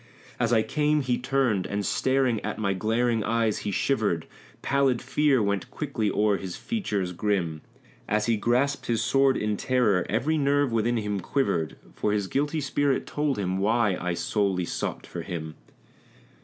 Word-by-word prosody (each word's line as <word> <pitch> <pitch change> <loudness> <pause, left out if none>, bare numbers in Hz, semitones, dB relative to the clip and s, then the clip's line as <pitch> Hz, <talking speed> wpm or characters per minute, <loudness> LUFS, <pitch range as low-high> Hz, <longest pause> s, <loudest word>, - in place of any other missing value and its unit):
As 120 -1 +1
I 110 -2 +4
came 150 +2 +1
he 125 -2 0
turned, 125 -7 +1
and 100 0 -2
staring 130 -4 +1
at 110 - -4
my 100 -3 0
glaring 115 +3 +1
eyes 115 -1 +1
he 105 - -3
shivered; 100 -6 0 0.4
Pallid 135 -3 +2
fear 145 -6 +2
went 100 -2 -1
quickly 130 -8 -2
o'er 105 0 +2
his 95 -2 -6
features 105 - -2
grim; 85 -5 -1 0.5
As 105 +1 +1
he 115 - +2
grasped 125 +6 0
his 115 -2 +1
sword 135 -1 +3
in 105 -1 -1
terror, 120 -8 +2
every 155 +2 +1
nerve 140 -1 +2
within 115 +1 +1
him 105 -2 -2
quivered, 90 - -1 0.2
For 105 - -1
his 105 -2 0
guilty 145 - -1
spirit 140 0 0
told 145 -3 -1
him 95 -1 -1
why 105 -1 +2
I 90 -1 -1
solely 95 -2 0
sought - - -4
for 85 - -6
him. 80 -3 -5
110 Hz, 165 wpm, -26 LUFS, 100-135 Hz, 0.5 s, I